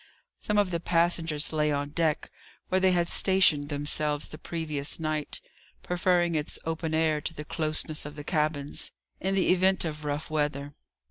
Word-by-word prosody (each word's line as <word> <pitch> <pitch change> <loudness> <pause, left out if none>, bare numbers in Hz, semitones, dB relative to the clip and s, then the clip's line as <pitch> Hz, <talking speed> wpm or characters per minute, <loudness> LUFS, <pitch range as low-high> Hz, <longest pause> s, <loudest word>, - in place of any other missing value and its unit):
Some 210 - 0
of 200 -3 +2
the 170 - 0
passengers 165 -2 +1
lay 150 -1 +2
on 145 0 -1
deck, 155 0 -1 0.4
where 185 - +3
they 190 0 +5
had 175 -1 +2
stationed 175 -7 +4
themselves 145 0 0
the 155 - -9
previous 155 -4 -2
night, 155 -2 -2 0.4
preferring 175 -1 +1
its 150 -1 -2
open 160 0 -2
air 160 -2 +2
to 165 - -5
the 150 - -7
closeness 155 0 -1
of 150 0 -7
the 145 - -7
cabins, 150 -3 -1 0.3
in 190 +1 -1
the 190 - +2
event 185 0 +3
of 150 -1 -5
rough 150 +1 -3
weather. 145 -2 -1
155 Hz, 170 wpm, -28 LUFS, 150-170 Hz, 0.4 s, they